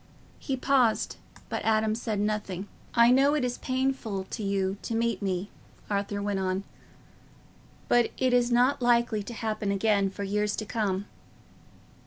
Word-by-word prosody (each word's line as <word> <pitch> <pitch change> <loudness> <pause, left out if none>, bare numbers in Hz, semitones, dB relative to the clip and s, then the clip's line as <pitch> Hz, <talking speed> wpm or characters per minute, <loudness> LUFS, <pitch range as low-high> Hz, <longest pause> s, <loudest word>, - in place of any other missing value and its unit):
He 270 -2 -2
paused, 255 -4 +2 0.3
but - - -3
Adam 220 -1 +2
said 220 -2 -2
nothing. 205 -2 -2 0.3
"I 235 0 +6
know 275 +3 +4
it 285 -4 +1
is 245 0 -3
painful 255 -6 -1
to 225 - -4
you 195 -1 0
to 230 - -3
meet 230 -3 0
me," 190 0 -2 0.4
Arthur 200 0 -1
went 200 -1 -1
on, 190 0 -1 1.2
"but 240 -1 +4
it 255 -1 +2
is 245 0 +3
not 250 +3 +3
likely 235 -3 +3
to 220 +4 -7
happen 215 -2 -2
again 200 -1 +2
for 200 +1 -6
years 210 +1 0
to 215 - -4
come." 200 -3 -1
215 Hz, 155 wpm, -28 LUFS, 200-240 Hz, 1.2 s, I